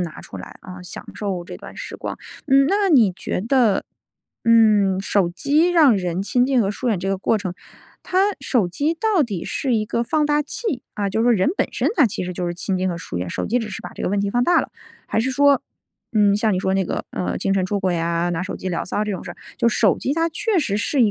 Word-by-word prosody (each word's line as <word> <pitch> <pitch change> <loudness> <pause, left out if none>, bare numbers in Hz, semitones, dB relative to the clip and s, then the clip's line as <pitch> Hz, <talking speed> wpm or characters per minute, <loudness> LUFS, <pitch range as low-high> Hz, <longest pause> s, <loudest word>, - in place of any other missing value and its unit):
拿 170 -3 -5
出 95 - -10
来， 90 - -10
啊， 180 -1 -10
享 180 - -8
受 190 -4 -3
这 - - -8
段 - - -12
时 - - -7
光。 - - -6 0.3
嗯， 275 +1 +5
那 400 0 +2
你 230 - +5
觉 185 - -3
得， 230 -2 +2 0.6
嗯， 210 -4 +4
手 195 -2 +1
机 295 - +2
让 300 -10 +5
人 180 -1 -2
亲 245 +4 +2
近 265 -3 +2
和 195 - +1
疏 245 +4 -3
远 210 -6 +1
这 190 +2 -3
个 195 - +1
过 220 +3 +1
程， 185 -3 -4 0.5
它 370 - -1 0.2
手 245 -7 +1
机 290 - 0
到 400 -2 +2
底 200 -9 -4
是 260 -4 -1
一 215 -1 -1
个 235 +1 -1
放 300 +5 +1
大 295 0 +2
器， 295 - -4
啊， 205 -1 -1
就 220 +3 0
说 240 0 +4
人 190 +2 +2
本 - - +1
身 - - 0
他 285 -7 +6
其 190 - -4
实 180 - -4
就 180 0 -4
是 175 - -2
亲 190 +2 -2
近 185 0 0
和 170 -2 -3
疏 90 - -7
远， 90 -1 -4
手 - - -3
机 245 +3 +1
只 215 -2 -5
是 - - -6
把 180 - -7
这 - - -8
个 - - 0
问 200 +1 0
题 200 - 0
放 245 +2 +1
大 350 - +4
了。 - - -6 0.4
还 220 - 0
是 260 +3 0
说， 280 0 +4 0.5
嗯， 205 -2 +4
像 215 0 +1
你 - - 0
说 190 0 0
那 190 -1 +1
个， - - -3
呃， - - -3
精 195 - 0
神 190 - +1
出 205 +1 -1
轨 185 -2 0
啊， 170 +1 0
拿 170 +1 -2
手 185 - -5
机 190 - -5
聊 170 - -2
骚 210 +3 -1
这 210 - -2
种 185 - -5
事 - - -7
儿， - - -20 0.2
就 235 - +3
是 - - -1
手 210 -5 +4
机 275 - -1
它 330 +1 +1
确 405 +3 0
实 210 -9 0
是 245 +5 +1
一 215 - +4
210 Hz, 285 characters per minute, -21 LUFS, 185-265 Hz, 0.6 s, 他